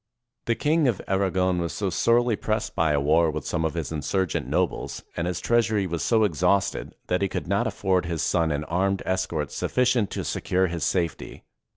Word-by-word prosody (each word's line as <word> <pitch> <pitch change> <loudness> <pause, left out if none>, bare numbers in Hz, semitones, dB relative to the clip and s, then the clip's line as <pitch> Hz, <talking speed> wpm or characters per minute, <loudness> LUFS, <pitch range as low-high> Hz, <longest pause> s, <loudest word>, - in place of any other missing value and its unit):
The 115 - +1
King 155 +2 +2
of 115 -7 0
Aragon 95 -2 +1
was 85 -1 -2
so 100 -3 -2
sorely 115 +4 +3
pressed 110 +1 -2
by 80 -2 +2
a 70 - +2
war 80 +4 +3
with 75 -2 -4
some 80 - -1
of 80 0 -1
his 80 -4 -3
insurgent 80 +4 -1
nobles, - - -1
and 85 - -2
his 90 -1 -2
treasury 110 -2 +2
was 85 -2 -3
so 110 -2 +3
ex 90 -6 -1
hausted, 100 +2 +1
that 90 +1 0
he 100 - +1
could - - -3
not - - +1
afford 90 -2 0
his 85 -3 -2
son 85 -2 +1
an 75 +1 -1
armed 95 +4 0
escort 85 -6 -1
sufi&cient 125 -4 +1
to - - -4
secure 95 +1 0
his 85 -3 -3
safety. 85 -2 -2
90 Hz, 200 wpm, -25 LUFS, 80-100 Hz, -, sorely